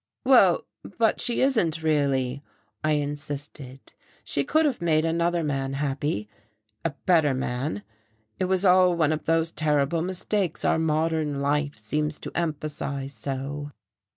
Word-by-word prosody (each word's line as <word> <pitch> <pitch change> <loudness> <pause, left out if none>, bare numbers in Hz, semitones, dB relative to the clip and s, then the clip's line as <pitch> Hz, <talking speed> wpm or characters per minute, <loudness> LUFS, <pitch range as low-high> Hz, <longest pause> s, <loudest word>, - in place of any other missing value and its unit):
"Well, 235 -10 +5 0.3
but 225 -2 +2
she 240 - -1
isn't 175 - +2
really," 140 -4 +1 0.4
I 155 0 +2
insisted. 145 -2 -5 0.3
"She 140 - -1
could 315 - +2
have 275 -9 0
made 160 -2 +2
another 170 +1 +1
man 135 -2 -2
happy 135 -5 -2 0.6
a 165 - +1 0.2
better 160 -7 +4
man. 125 -3 -3 0.6
It 185 - +1
was 190 +1 +1
all 180 -1 +5
one 160 -3 +2
of 155 - -3
those 165 0 +1
terrible 150 +1 +1
mistakes 185 0 -1
our - - +3
modern 155 -2 0
life 145 0 0
seems 150 +8 -2
to - - -6
emphasize 145 -4 -3
so." 145 +2 -5
150 Hz, 135 wpm, -25 LUFS, 140-170 Hz, 0.6 s, Well